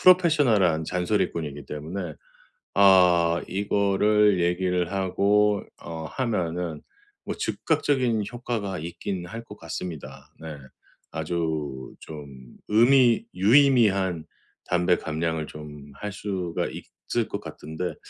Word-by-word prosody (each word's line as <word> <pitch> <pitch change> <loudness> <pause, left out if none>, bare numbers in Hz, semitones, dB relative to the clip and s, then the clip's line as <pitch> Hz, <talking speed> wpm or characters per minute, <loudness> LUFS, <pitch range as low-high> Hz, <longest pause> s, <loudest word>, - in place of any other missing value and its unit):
professional한 135 - +4
잔소리꾼이기 85 -5 -2
때문에 80 +3 -5 0.6
아 90 -4 +5
이거를 100 +1 +2
얘기를 90 0 0
하고 100 +2 +2 0.2
어 80 -1 -6
하면은 90 - -2 0.5
뭐 - - -2
즉각적인 125 -6 0
효과가 115 -6 -3
있긴 85 +3 -5
할 115 +6 -7
것 105 -2 -12
같습니다. 80 -2 -7
네. 80 -1 -7 0.6
아주 80 -4 -3
좀 75 -2 -9 0.4
의미 120 +2 +5
유의미한 100 - +4 0.4
담배 90 0 +2
감량을 80 0 -2
좀 75 -1 -10
할 105 0 -5
수가 95 -4 -3
있을 - - -4
것 - - -3
같은데 80 +4 -6
90 Hz, 250 characters per minute, -25 LUFS, 80-105 Hz, 0.6 s, 아